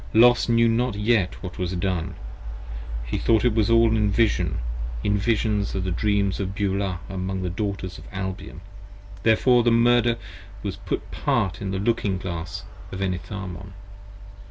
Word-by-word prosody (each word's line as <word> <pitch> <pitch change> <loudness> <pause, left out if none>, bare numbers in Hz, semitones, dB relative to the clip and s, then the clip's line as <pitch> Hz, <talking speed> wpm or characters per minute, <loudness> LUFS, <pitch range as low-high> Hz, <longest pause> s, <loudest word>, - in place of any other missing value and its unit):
Los 120 +2 +6
knew 115 0 +5
not 115 0 +1
yet 105 -3 +1
what 90 -1 -7
was 90 0 -1
done: 90 -2 -2 0.9
he - - -2
thought 115 0 +3
it 120 - +4
was 110 0 +2
all 115 -1 +5
in 105 -2 +2
Vision, 110 +1 +2 0.5
In 105 - +2
Visions 105 -1 0
of 95 - -1
the 95 - -2
Dreams 100 +1 +1
of 95 -1 -3
Beulah 95 -3 -1
among 95 0 -3
the 90 - -2
Daughters 95 -2 -3
of - - -13
Albion, 95 -2 -5 0.6
Therefore 120 +3 +4
the 120 - +3
Murder 120 0 +4 0.5
was 100 -2 -3
put - - -3
apart 95 -1 0
in 100 - -3
the 95 - -1
Looking 100 -2 0
Glass 85 -3 -5 0.3
of 95 - -5
Enitharmon. 95 0 -4
100 Hz, 155 wpm, -24 LUFS, 95-115 Hz, 0.9 s, Los